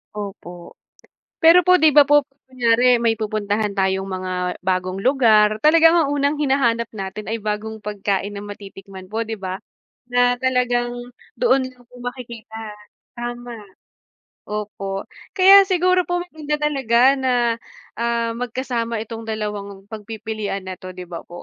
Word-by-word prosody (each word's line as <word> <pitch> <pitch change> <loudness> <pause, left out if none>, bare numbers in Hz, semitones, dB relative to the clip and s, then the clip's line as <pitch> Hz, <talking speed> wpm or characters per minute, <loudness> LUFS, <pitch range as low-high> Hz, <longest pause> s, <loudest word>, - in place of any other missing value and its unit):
Opo, 185 -4 -8 0.7
pero 345 +2 +7
po 365 - +6
'di 310 - +7
ba 290 -1 +6
po 290 0 +5 0.2
kunyari 250 -1 +3
may 225 -1 +1
pupuntahan 210 -1 -2
tayong 190 0 0
mga 185 -1 -3
bagong 185 +1 -1
lugar, 220 -5 +4
talagang 325 +4 +5
ang 305 -4 +2
unang 285 +1 0
hinahanap 255 -5 +1
natin 195 +1 -6
ay 225 -1 -4
bagong 215 0 -4
pagkain 200 -1 -2
na 205 - -7
matitikman 195 -2 -11
po 225 +1 -2
'di 220 - -4
ba? 190 -2 -5 0.5
Na 245 0 +2
talagang 245 -1 0 0.4
doon 270 - +2
lang 250 -1 -14
po 250 - -15
makikita 240 -3 -8 0.6
tama, 240 -1 -6 0.9
opo. 200 -2 -4 0.3
Kaya 390 +1 +8
siguro 365 -1 +2
po 355 -1 -1
maganda 310 -4 -5
talaga 265 -6 +1 0.2
na 260 -1 0 0.7
ah 235 0 0
magkasama 235 -2 -3
itong 225 0 -8
dalawang 205 -2 -5
pagpipilian 215 -2 -5
nito, 185 0 -8
'di 180 -1 -10
ba 170 - -7
po? 175 0 -10
225 Hz, 135 wpm, -21 LUFS, 200-260 Hz, 0.9 s, Kaya